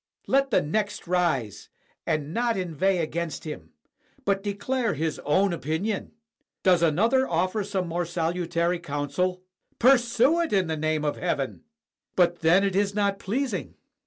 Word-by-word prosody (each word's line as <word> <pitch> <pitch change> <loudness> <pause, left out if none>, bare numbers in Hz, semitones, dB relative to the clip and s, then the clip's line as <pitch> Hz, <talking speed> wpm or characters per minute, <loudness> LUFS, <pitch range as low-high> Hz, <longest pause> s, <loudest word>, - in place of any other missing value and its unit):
Let 275 0 +2
the - - +3
next 205 +7 -2
rise, 170 - -1 0.4
and 155 -1 -1
not 235 0 +1
inveigh 185 +1 0
against 170 0 -3
him, 90 - -7 0.6
but 195 -1 +1
declare 210 +3 -1
his 160 +1 -2
own 185 +6 +2
opinion. 170 +9 -2 0.5
Does 180 -2 +4
another 225 - +3
offer 185 +3 0
some 190 -2 -2
more 170 +1 -2
salutary 170 0 -1
coun 145 -3 -4
sel? 180 +3 -1 0.3
Pursue 250 +4 +4
it, 335 - -2
in 190 -2 +3
the 160 -1 -2
name 155 0 -1
of 150 - -1
heaven! 145 -7 -2 0.5
"But 175 -1 +3
then 170 +4 +4
it 195 -2 0
is 200 0 +1
not 200 -1 +1
pleasing." 210 - -3
180 Hz, 150 wpm, -26 LUFS, 160-205 Hz, 0.6 s, Does